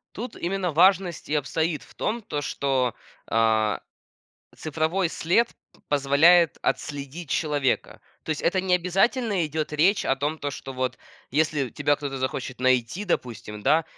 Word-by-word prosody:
Тут 235 Hz, +4 st, -6 dB
именно 180 Hz, 0 st, -2 dB
важность 180 Hz, +1 st, +3 dB
и -, -, -3 dB
обстоит 155 Hz, +2 st, -1 dB
в -, -, -18 dB
том, 235 Hz, +2 st, -2 dB
то, 150 Hz, -8 st, -4 dB
что, 135 Hz, -4 st, 0 dB, 0.4 s
э, 110 Hz, -1 st, +2 dB, 0.8 s
цифровой 160 Hz, +3 st, -1 dB
след 185 Hz, +10 st, +2 dB, 0.4 s
позволяет 145 Hz, +5 st, +5 dB
отследить 145 Hz, +3 st, -3 dB
человека. 145 Hz, -5 st, 0 dB, 0.2 s
То -, -, -11 dB
есть 155 Hz, -, -1 dB
это 185 Hz, +2 st, +1 dB
не 185 Hz, -1 st, +1 dB
обязательно 195 Hz, -, +2 dB
идет 155 Hz, 0 st, -3 dB
речь 180 Hz, +7 st, +3 dB
о 135 Hz, -, +2 dB
том, 145 Hz, +3 st, -2 dB
то, 145 Hz, -, -2 dB
что 135 Hz, -1 st, -7 dB
вот 130 Hz, 0 st, -2 dB, 0.3 s
если 150 Hz, -2 st, +1 dB
тебя 145 Hz, +5 st, +1 dB
кто-то 140 Hz, -2 st, -4 dB
захочет 130 Hz, -1 st, -3 dB
найти, 130 Hz, -, +1 dB
допустим, 115 Hz, -, -3 dB
да, 155 Hz, +7 st, +3 dB
150 Hz, 145 wpm, -25 LUFS, 135-175 Hz, 0.8 s, позволяет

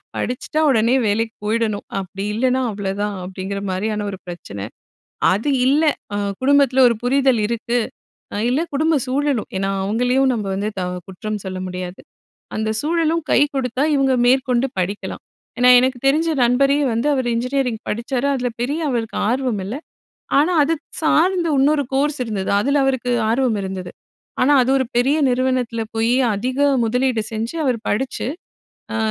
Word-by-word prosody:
"படிச்சுட்டா 255 Hz, +5 st, -2 dB
உடனே 235 Hz, -1 st, +3 dB
வேலைக்கு 225 Hz, +2 st, 0 dB
போயிடணும். 215 Hz, -1 st, -1 dB
அப்படி 195 Hz, +1 st, -6 dB
இல்லைனா 255 Hz, +3 st, +1 dB
அவ்வளதான்." 200 Hz, +1 st, -3 dB
அப்படிங்கிற 190 Hz, +2 st, -5 dB
மாரியான 210 Hz, +2 st, -2 dB
ஒரு 190 Hz, -, -8 dB
பிரச்சனை. 100 Hz, -, -7 dB, 0.7 s
அது 220 Hz, +9 st, -1 dB, 0.2 s
இல்லை, 300 Hz, +4 st, +4 dB, 0.3 s
அ -, -, -1 dB, 0.2 s
குடும்பத்தில 275 Hz, -1 st, +3 dB
ஒரு 235 Hz, -, +2 dB
புரிதல் 260 Hz, -2 st, +2 dB
இருக்கு. 235 Hz, +1 st, -1 dB, 0.6 s
அ -, -, -3 dB
இல்லை 280 Hz, +6 st, +1 dB
குடும்ப 315 Hz, +3 st, +2 dB
சூழலும். 275 Hz, -2 st, 0 dB
ஏன்னா 195 Hz, +1 st, -1 dB
அவங்களையும் 250 Hz, +6 st, +2 dB
நம்ப 215 Hz, -3 st, -3 dB
வந்து 205 Hz, +2 st, -2 dB
த -, -, -2 dB, 0.3 s
குற்றம் 210 Hz, +2 st, -5 dB
சொல்ல 185 Hz, 0 st, -4 dB
முடியாது. 180 Hz, 0 st, -6 dB, 0.6 s
அந்த 220 Hz, 0 st, -1 dB
சூழலும் 330 Hz, +1 st, 0 dB
கை -, -, +4 dB
குடுத்தா, 260 Hz, +1 st, 0 dB
இவங்க 270 Hz, -2 st, +2 dB
மேற்கொண்டு 255 Hz, 0 st, +3 dB
படிக்கலாம். 190 Hz, +3 st, -3 dB, 0.4 s
ஏன்னா 250 Hz, 0 st, +6 dB
எனக்கு 255 Hz, 0 st, 0 dB
தெரிஞ்ச 310 Hz, +4 st, +3 dB
நண்பரே 275 Hz, +4 st, +3 dB
வந்து, 230 Hz, +4 st, -1 dB
அவரு 260 Hz, -3 st, -1 dB
இன்ஜினியரிங் 250 Hz, -2 st, -1 dB
படிச்சாரு. 245 Hz, +4 st, -2 dB
அதில 245 Hz, -1 st, -1 dB
பெரிய 290 Hz, +6 st, -1 dB
அவருக்கு 230 Hz, -3 st, -2 dB
ஆர்வம் 245 Hz, -5 st, -1 dB
இல்லை. 230 Hz, +8 st, -4 dB, 0.6 s
ஆனா 310 Hz, +5 st, +3 dB
அது 320 Hz, +3 st, +1 dB, 0.3 s
சார்ந்த 340 Hz, +2 st, +2 dB
இன்னொரு 285 Hz, +2 st, +3 dB
கோர்ஸ் 290 Hz, +1 st, +1 dB
இருந்தது. 205 Hz, -4 st, -3 dB
அதில 280 Hz, +6 st, +2 dB
அவருக்கு 255 Hz, -2 st, 0 dB, 0.2 s
ஆர்வம் 240 Hz, -1 st, +1 dB
இருந்தது. 190 Hz, -2 st, -5 dB, 0.5 s
ஆனா 275 Hz, +3 st, +4 dB
அது 250 Hz, -, 0 dB
1 260 Hz, -, 0 dB
பெரிய 270 Hz, +5 st, +3 dB
நிறுவனத்தில 250 Hz, -2 st, 0 dB
போய், 225 Hz, +2 st, +2 dB, 0.2 s
அதிக 255 Hz, +5 st, -3 dB, 0.3 s
முதலீடு 250 Hz, 0 st, +1 dB
செஞ்சு, 225 Hz, +6 st, -3 dB
அவர் 255 Hz, -3 st, +1 dB
படிச்சு, 255 Hz, +5 st, -2 dB, 0.7 s
அ 225 Hz, -, -1 dB
245 Hz, 150 wpm, -20 LUFS, 215-270 Hz, 0.7 s, ஏன்னா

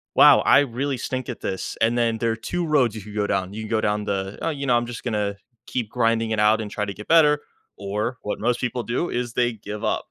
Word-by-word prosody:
"Wow. -, -, +8 dB
I -, -, +6 dB
really 135 Hz, +1 st, -2 dB
stink 130 Hz, +1 st, -4 dB
at 120 Hz, -, -6 dB
this." 95 Hz, -1 st, -4 dB
And 115 Hz, +2 st, +3 dB
then 115 Hz, -1 st, +1 dB
there 115 Hz, 0 st, 0 dB
are -, -, -1 dB
2 170 Hz, +10 st, -3 dB
roads 130 Hz, -8 st, +2 dB
you 110 Hz, -, -6 dB
could 105 Hz, +1 st, -11 dB
go 105 Hz, -1 st, 0 dB
down. 95 Hz, 0 st, -1 dB
You 110 Hz, -, -5 dB
can 110 Hz, -, -7 dB
go 110 Hz, -1 st, +1 dB
down 105 Hz, 0 st, 0 dB
the, 95 Hz, 0 st, -3 dB
"Oh, 165 Hz, -, 0 dB
you 140 Hz, -3 st, -3 dB
know, 125 Hz, -, +3 dB
I'm 120 Hz, -, -1 dB
just 120 Hz, -, -7 dB
gonna 105 Hz, -4 st, -1 dB, 0.3 s
keep 120 Hz, -5 st, -3 dB
grinding 115 Hz, -1 st, +1 dB
it 110 Hz, -, 0 dB
out 105 Hz, +1 st, +4 dB
and 105 Hz, -1 st, -6 dB
try 105 Hz, -, -2 dB
to 100 Hz, -, -5 dB
get 105 Hz, -, -11 dB
better," 150 Hz, -3 st, +5 dB, 0.4 s
or 105 Hz, +5 st, -3 dB
what 105 Hz, -, -3 dB
most 120 Hz, +2 st, 0 dB
people 125 Hz, 0 st, -1 dB
do 125 Hz, +10 st, -2 dB
is 120 Hz, -1 st, -3 dB
they 120 Hz, -1 st, +1 dB
give 105 Hz, 0 st, -8 dB
up. 110 Hz, -, -1 dB
115 Hz, 265 wpm, -23 LUFS, 105-125 Hz, 0.4 s, Wow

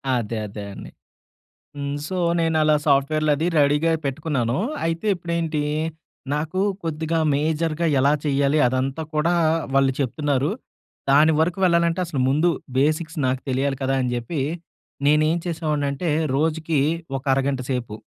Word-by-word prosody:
అదే. 115 Hz, -1 st, -2 dB
అదే 105 Hz, 0 st, -8 dB
అండి. -, -, -9 dB, 0.9 s
హ్మ్. 140 Hz, 0 st, -3 dB
సో, 185 Hz, -, -4 dB, 0.2 s
నేనలా 155 Hz, -2 st, +3 dB
సాఫ్ట్‌వేర్లది 150 Hz, +2 st, +2 dB
రెడీగా 150 Hz, +3 st, +3 dB
పెట్టుకున్నాను. 135 Hz, -4 st, -1 dB, 0.3 s
అయితే 165 Hz, +5 st, -2 dB
ఇప్పుడేంటి 170 Hz, -3 st, -2 dB, 0.7 s
నాకు 155 Hz, +5 st, -2 dB, 0.2 s
కొద్దిగా 160 Hz, +1 st, -1 dB, 0.2 s
మేజర్‌గా 160 Hz, +2 st, 0 dB
ఎలా 140 Hz, +2 st, +4 dB
చెయ్యాలి, 140 Hz, +1 st, +2 dB
అదంతా 130 Hz, +4 st, -1 dB
కూడా 160 Hz, +3 st, +2 dB, 0.4 s
వాళ్ళు 135 Hz, -1 st, +4 dB
చెప్తున్నారు. 140 Hz, +2 st, 0 dB, 0.6 s
దాని 150 Hz, +3 st, +6 dB
వరకు 175 Hz, +3 st, +1 dB
వెళ్ళాలంటే 170 Hz, 0 st, +2 dB
అసలు 150 Hz, -5 st, -3 dB
ముందు 155 Hz, +6 st, +3 dB, 0.3 s
బేసిక్స్ 155 Hz, +4 st, 0 dB
నాకు 130 Hz, 0 st, 0 dB
తెలియాలి 135 Hz, +1 st, 0 dB
కదా! 135 Hz, 0 st, +1 dB
అని 125 Hz, -1 st, -1 dB
జెప్పి, 120 Hz, +6 st, -3 dB, 0.7 s
నేనేం 155 Hz, +3 st, +3 dB
చేసేవాడినంటే 155 Hz, -1 st, -1 dB, 0.3 s
రోజుకి 160 Hz, +1 st, 0 dB, 0.4 s
ఒక 135 Hz, -, -7 dB
అరగంట 135 Hz, 0 st, 0 dB
సేపు 125 Hz, -4 st, -3 dB
150 Hz, 125 wpm, -23 LUFS, 135-160 Hz, 0.9 s, దాని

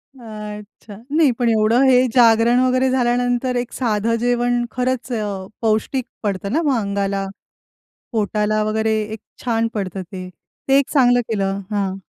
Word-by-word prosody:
अच्छा, 210 Hz, -3 st, -10 dB, 0.2 s
नाही 305 Hz, -4 st, +4 dB
पण 240 Hz, -1 st, +2 dB
एवढं 220 Hz, +3 st, +3 dB
हे 255 Hz, -1 st, +5 dB
जागरण 235 Hz, 0 st, +5 dB
वगैरे 255 Hz, +1 st, +2 dB
झाल्यानंतर 245 Hz, 0 st, +1 dB
एक 245 Hz, 0 st, -2 dB
साधं 230 Hz, -2 st, 0 dB
जेवण 245 Hz, 0 st, +1 dB
खरंच 255 Hz, 0 st, -2 dB
अ, 205 Hz, -4 st, -3 dB
पौष्टिक 225 Hz, +3 st, 0 dB, 0.2 s
पडतं 200 Hz, -1 st, -2 dB
ना 320 Hz, -, +2 dB
मग 280 Hz, -5 st, +1 dB
अंगाला. 200 Hz, -1 st, -1 dB, 0.9 s
पोटाला 215 Hz, 0 st, 0 dB
वगैरे 220 Hz, 0 st, 0 dB
एक 220 Hz, -, -6 dB, 0.2 s
छान 230 Hz, -1 st, +1 dB
पडतं 190 Hz, -2 st, -3 dB
ते. 185 Hz, 0 st, -8 dB
ते 270 Hz, -, -1 dB
एक 280 Hz, -, 0 dB
चांगलं 245 Hz, -4 st, +4 dB
केलं 195 Hz, -3 st, -1 dB
हां. 195 Hz, -2 st, -2 dB
225 Hz, 145 wpm, -20 LUFS, 210-245 Hz, 0.9 s, हे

